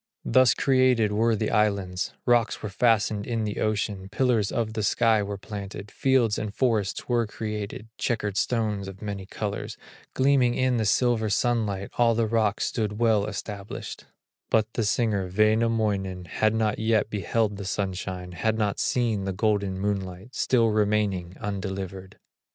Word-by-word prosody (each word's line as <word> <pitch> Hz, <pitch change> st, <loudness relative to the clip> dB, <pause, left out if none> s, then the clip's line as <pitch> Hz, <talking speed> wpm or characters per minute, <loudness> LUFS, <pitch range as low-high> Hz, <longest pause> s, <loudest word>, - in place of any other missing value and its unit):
Thus 130 Hz, -2 st, +5 dB
created 130 Hz, -5 st, +3 dB
were 115 Hz, +2 st, +2 dB
the 110 Hz, 0 st, -1 dB
islands, 100 Hz, -4 st, 0 dB
Rocks 120 Hz, -2 st, +2 dB
were 110 Hz, -, -3 dB
fastened 105 Hz, -1 st, +1 dB
in 115 Hz, -2 st, -1 dB
the 105 Hz, -1 st, -3 dB
ocean, 105 Hz, -3 st, -1 dB
Pillars 110 Hz, -2 st, +1 dB
of 115 Hz, -3 st, -1 dB
the 110 Hz, -, -2 dB
sky 110 Hz, +1 st, +3 dB
were 100 Hz, 0 st, -4 dB
planted, 100 Hz, 0 st, -7 dB
Fields 130 Hz, -5 st, +2 dB
and 105 Hz, -, -3 dB
forests 110 Hz, -4 st, 0 dB
were 120 Hz, -2 st, +1 dB
created, 105 Hz, 0 st, -5 dB
Checkered 105 Hz, -5 st, -1 dB
stones 105 Hz, -2 st, 0 dB
of 95 Hz, +2 st, -9 dB
many 100 Hz, -2 st, -5 dB
colors, 105 Hz, 0 st, -4 dB, 0.4 s
Gleaming 130 Hz, -3 st, +3 dB
in 130 Hz, -1 st, +1 dB
the 110 Hz, -, 0 dB
silver 115 Hz, 0 st, +2 dB
sunlight, 105 Hz, -3 st, 0 dB
All 115 Hz, -1 st, +4 dB
the 115 Hz, 0 st, +2 dB
rocks 110 Hz, -1 st, +1 dB
stood 105 Hz, -3 st, -2 dB
well 110 Hz, -3 st, +2 dB
established; 100 Hz, -1 st, -6 dB, 0.4 s
But 110 Hz, 0 st, +1 dB
the 115 Hz, -, 0 dB
singer, 105 Hz, -4 st, 0 dB
Wainamoinen, 110 Hz, -3 st, +1 dB
Had 110 Hz, +5 st, +1 dB
not 110 Hz, -1 st, 0 dB
yet 110 Hz, -1 st, +1 dB
beheld 105 Hz, +1 st, 0 dB
the 100 Hz, -, -6 dB
sunshine, 95 Hz, -1 st, -3 dB
Had 110 Hz, +6 st, -1 dB
not 105 Hz, -2 st, 0 dB
seen 115 Hz, -6 st, 0 dB
the 95 Hz, -, -2 dB
golden 100 Hz, -1 st, 0 dB
moonlight, 100 Hz, +2 st, -3 dB
Still 115 Hz, -3 st, +2 dB
remaining 105 Hz, -4 st, 0 dB
undelivered. 95 Hz, -2 st, -5 dB
105 Hz, 150 wpm, -26 LUFS, 100-115 Hz, 0.4 s, Thus